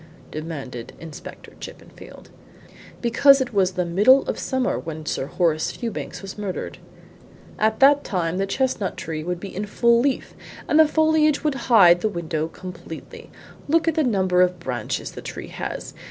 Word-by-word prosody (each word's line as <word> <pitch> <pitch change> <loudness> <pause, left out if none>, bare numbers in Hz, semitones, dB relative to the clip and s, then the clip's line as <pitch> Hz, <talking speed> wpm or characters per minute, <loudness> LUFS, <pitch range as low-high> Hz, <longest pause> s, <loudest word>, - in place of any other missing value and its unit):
demanded 140 -7 -7
Inspector 160 -3 -10
Chippenfield. - - -12 0.7
"Because 275 +4 +5
it 255 -3 -3
was 190 -2 +2
the 180 -1 -1
middle 210 +11 +5
of - - -4
summer 260 -1 -1
when 160 -1 -7
Sir 135 - -2
Horace 160 -1 0
Fewbanks 230 -3 -6
was 195 +2 -8
murdered. 200 -3 -5 0.8
At 220 0 +1
that 285 +1 +6
time 180 -2 -2
that 195 0 -1
chestnut 255 -6 -1
tree 155 -1 -5
would 175 +1 -3
be 195 0 -8
in 205 +2 -3
full 235 +3 +3
leaf, 270 +2 -1 0.3
and 305 - +3
the 315 - +7
foliage 310 -1 +2
would 300 -2 +1 0.2
hide 175 -7 +7
the 215 - +1
window 160 -4 -3
completely. 175 -2 -10 0.4
Look 330 +3 +2
at 330 - +3
the 315 - +1
number 190 -7 +2
of 180 -1 +2
branches 125 -8 -4
the - - -9
tree - - -7
has! - - -6
195 Hz, 165 wpm, -23 LUFS, 170-260 Hz, 0.8 s, the